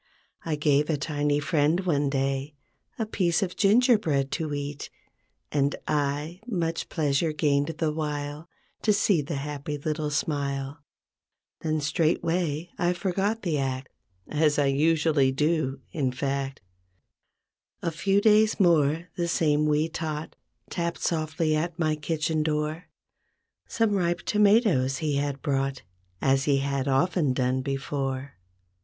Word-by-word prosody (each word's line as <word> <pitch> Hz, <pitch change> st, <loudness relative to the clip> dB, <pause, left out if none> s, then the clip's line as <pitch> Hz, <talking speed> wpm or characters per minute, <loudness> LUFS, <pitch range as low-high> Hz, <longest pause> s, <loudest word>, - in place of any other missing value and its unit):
I 160 Hz, -2 st, -1 dB
gave 150 Hz, 0 st, +2 dB
a 155 Hz, -, +1 dB
tiny 145 Hz, 0 st, 0 dB
friend, 155 Hz, +3 st, +2 dB
one 145 Hz, -6 st, +1 dB
day, 135 Hz, +1 st, -1 dB, 0.4 s
A 225 Hz, -, -1 dB
piece 180 Hz, -5 st, +1 dB
of 180 Hz, -1 st, -4 dB
gingerbread 205 Hz, -, +3 dB
to 160 Hz, -3 st, -2 dB
eat, 145 Hz, 0 st, -4 dB, 0.6 s
And 140 Hz, 0 st, +1 dB
1, 150 Hz, +3 st, -1 dB
much 170 Hz, -7 st, -2 dB
pleasure 155 Hz, +1 st, +1 dB
gained 145 Hz, 0 st, +1 dB
the 155 Hz, -2 st, 0 dB
while 150 Hz, +1 st, -4 dB, 0.3 s
To 215 Hz, -, +3 dB
see 200 Hz, -5 st, +3 dB
the 145 Hz, +2 st, -4 dB
happy 145 Hz, +1 st, -4 dB
little 150 Hz, +1 st, -2 dB
smile. 140 Hz, -1 st, -2 dB, 0.8 s
Then 155 Hz, -1 st, -1 dB
straightway 165 Hz, +1 st, 0 dB
I 175 Hz, 0 st, +2 dB
forgot 195 Hz, +5 st, -1 dB
the 160 Hz, -6 st, 0 dB
act 130 Hz, -1 st, -3 dB, 0.4 s
As 150 Hz, -1 st, +2 dB
usually 150 Hz, +1 st, +3 dB
I 130 Hz, -, 0 dB
do, 150 Hz, -2 st, 0 dB
in 135 Hz, -5 st, 0 dB
fact. 135 Hz, +1 st, -3 dB, 1.2 s
A 170 Hz, -, 0 dB
few 195 Hz, +5 st, +1 dB
days 215 Hz, 0 st, +4 dB
more, 165 Hz, -2 st, +3 dB
the 170 Hz, -1 st, -1 dB
same 150 Hz, -2 st, +2 dB
wee 150 Hz, +1 st, +2 dB
tot 160 Hz, -1 st, -5 dB, 0.4 s
Tapped 170 Hz, -1 st, -2 dB
softly 155 Hz, -1 st, 0 dB
at 165 Hz, +2 st, -2 dB
my 155 Hz, -3 st, +1 dB
kitchen 155 Hz, +1 st, -1 dB
door. 155 Hz, +2 st, -1 dB, 0.8 s
Some 225 Hz, -4 st, +1 dB
ripe 175 Hz, -3 st, 0 dB
tomatoes 205 Hz, -, +3 dB
he 150 Hz, -3 st, -1 dB
had 140 Hz, -1 st, -2 dB
brought 135 Hz, -2 st, -1 dB, 0.4 s
As 135 Hz, 0 st, +3 dB
he 140 Hz, -2 st, +3 dB
had 140 Hz, 0 st, -1 dB
often 140 Hz, +1 st, +2 dB
done 130 Hz, 0 st, 0 dB
before. 135 Hz, 0 st, -3 dB
150 Hz, 135 wpm, -26 LUFS, 140-170 Hz, 1.2 s, days